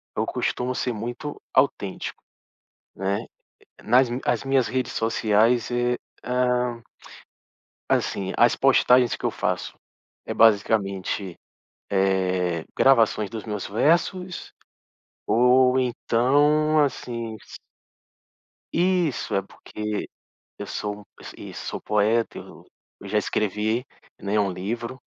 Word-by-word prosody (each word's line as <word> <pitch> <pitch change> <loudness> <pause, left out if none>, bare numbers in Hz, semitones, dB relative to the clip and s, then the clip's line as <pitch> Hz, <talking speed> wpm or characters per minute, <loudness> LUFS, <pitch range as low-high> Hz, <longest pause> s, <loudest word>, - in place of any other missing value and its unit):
eu - - 0
costumo 125 +1 -2
ser 125 - -1
muito 120 +7 -6
autêntico, 100 -8 0 0.7
né. 100 +4 -2 0.6
Nas 125 0 +4
mi 125 +2 -3
as 120 +1 +1
minhas 135 -2 +2
redes 130 0 -2
sociais, 115 +1 +2
eh, 120 0 +1 0.3
hã 125 -1 0 1.1
assim, 95 -1 0
as 120 - +5
postagens 125 -2 +4
que - - -7
eu - - +1
faço - - -2 0.5
é - - -3
basicamente, 100 -4 +2 0.6
eh, 95 -3 +1
gravações 115 -5 +4
dos 110 -3 -6
meus 105 -3 -4
versos 170 - 0 0.7
ou 125 +2 +4
então, 145 +5 +2
assim, 115 -4 -4
s - - -12 1.2
Isso, 175 -5 +1
é 100 - +2
porque 105 +2 -6 0.5
eu - - -6
sou 105 0 -4
um - - -16 0.2
is - - -10
isso, - - -8
sou - - -5
poeta, 110 +2 +1
eu - - -12 0.4
eu 100 - -9
já 105 +2 0
escrevi, 110 +4 -1 0.4
né, 100 +2 -1
um 100 -2 +2
livro, 115 +8 -5
115 Hz, 115 wpm, -24 LUFS, 105-125 Hz, 1.2 s, as